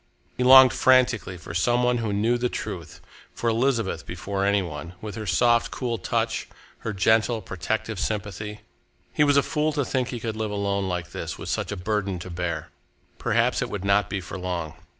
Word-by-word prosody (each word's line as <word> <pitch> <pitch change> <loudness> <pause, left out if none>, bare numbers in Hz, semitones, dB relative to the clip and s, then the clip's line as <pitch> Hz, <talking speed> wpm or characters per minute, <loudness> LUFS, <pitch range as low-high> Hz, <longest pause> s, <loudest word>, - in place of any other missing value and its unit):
He 125 - -1
longed 130 0 +9
frantically 125 -7 +3
for 85 -1 -9
some 120 +9 +2
one 125 0 +2
who 110 -2 -2
knew 110 +4 +2
the 125 0 0
truth, - - -6 0.3
for 115 - 0
Elizabeth 115 0 0
before 100 -1 -4
any 100 0 +2
one, 85 +1 -7
with 105 +1 -6
her 110 +1 -6
soft, 120 +6 +3
cool 120 -4 -3
touch, 90 - -1 0.3
her 115 - -4
gentle, 110 +4 +2
protective 100 +2 -3
sympathy. 105 0 -4 0.5
He 150 - +3
was 145 -1 +4
a 140 - +5
fool 150 +3 0
to 145 -2 0
think 130 -2 -1
he 120 - -5
could 110 -1 -4
live 110 -1 -2
alone 100 -1 -1
like 90 -3 -3
this, - - -5
with - - -7
such - - -2
a 105 - -3
burden 100 0 -1
to 90 +1 -8
bear! 85 -1 -3 0.5
Perhaps - - +1
it - - -2
would 100 -1 -4
not 100 -1 +3
be 95 -1 -2
for 95 - -7
long. 90 -4 -3
105 Hz, 195 wpm, -25 LUFS, 95-120 Hz, 0.5 s, longed